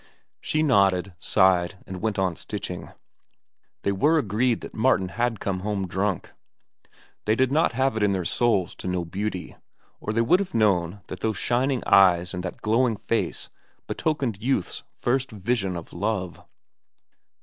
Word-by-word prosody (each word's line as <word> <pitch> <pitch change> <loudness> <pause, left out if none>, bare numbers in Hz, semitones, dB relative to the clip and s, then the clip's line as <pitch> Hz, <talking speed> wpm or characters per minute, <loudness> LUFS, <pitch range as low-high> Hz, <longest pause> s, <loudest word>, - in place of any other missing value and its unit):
She 155 0 0
nodded, 100 - +3
sighed, 95 -1 +3
and 95 -1 -7
went 110 -2 -1
on 95 -3 +1
stitching. - - -6 0.9
They 100 - +1
were 150 +12 +3
agreed 115 -1 +1
that - - -9
Martin 110 -5 +2
had 120 +1 -1
come 95 -2 -2
home 100 -1 -2
drunk. 95 +1 -2 0.9
They 110 - +3
did 130 +2 +2
not 155 -2 +2
have 130 0 +1
it 110 - -1
in 105 -1 +3
their 95 -3 -1
souls 105 -6 +1
to - - -6
know 90 -1 -1
beauty, 95 +1 -4 0.4
or 105 - -3
they 115 +2 +2
would 150 +11 +4
have 200 -10 -4
known 100 -3 +2
that 90 - -8
those 110 -2 -1
shining 125 +1 0
eyes 90 -2 +5
and 90 - -3
that 90 - -7
glowing 115 +1 +2
face 115 - -2 0.4
betokened 135 -10 -2
youth's 125 -6 -1 0.2
first 130 +2 +1
vision 105 -3 -1
of 85 - -9
love. 95 -2 -3
105 Hz, 160 wpm, -25 LUFS, 95-120 Hz, 0.9 s, eyes